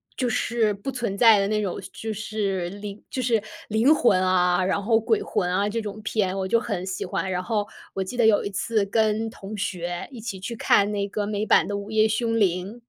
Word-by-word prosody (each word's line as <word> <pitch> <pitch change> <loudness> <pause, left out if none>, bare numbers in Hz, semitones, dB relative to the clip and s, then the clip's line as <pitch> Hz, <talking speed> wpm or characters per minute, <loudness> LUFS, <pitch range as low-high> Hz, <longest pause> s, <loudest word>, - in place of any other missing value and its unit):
就 250 -3 0
是 225 -2 +1
不 200 +7 -6
存 235 -6 -3
在 225 -3 +7
的 195 - +1
那 215 0 +1
种， 195 -4 -3
就 220 0 -5
是 200 -4 -2
灵 205 +1 -8
就 260 - -3
是 235 -3 +2 0.3
灵 225 +8 +4
魂 205 -10 +3
啊， 180 0 +3
然 190 +2 0
后 225 +2 +3
鬼 410 - +1
魂 180 - -1
啊， 200 +2 +1
这 225 +2 -2
种 215 0 -7
片， 195 -4 0
我 190 - -1
就 230 - +3
很 200 -6 -3
喜 190 -1 -4
欢。 190 +1 -2
然 180 0 -2
后 210 -2 -1 0.3
我 195 - -2
记 190 +6 -4
得 240 - +3
有 215 -2 +4
一 - - -2
次 210 +1 0
跟 220 +2 +1
同 210 -1 -8
学 175 -2 -3
一 245 -4 -9
起 205 -4 -5
去 230 +5 -5
看 205 -2 +3
那 200 -1 -1
个 205 0 -2
美 210 0 -2
版 - - +4
的 205 - -2
《午 200 +2 -7
夜 220 0 +4
凶 225 +1 0
铃》。 185 +2 0
210 Hz, 245 characters per minute, -24 LUFS, 195-225 Hz, 0.3 s, 在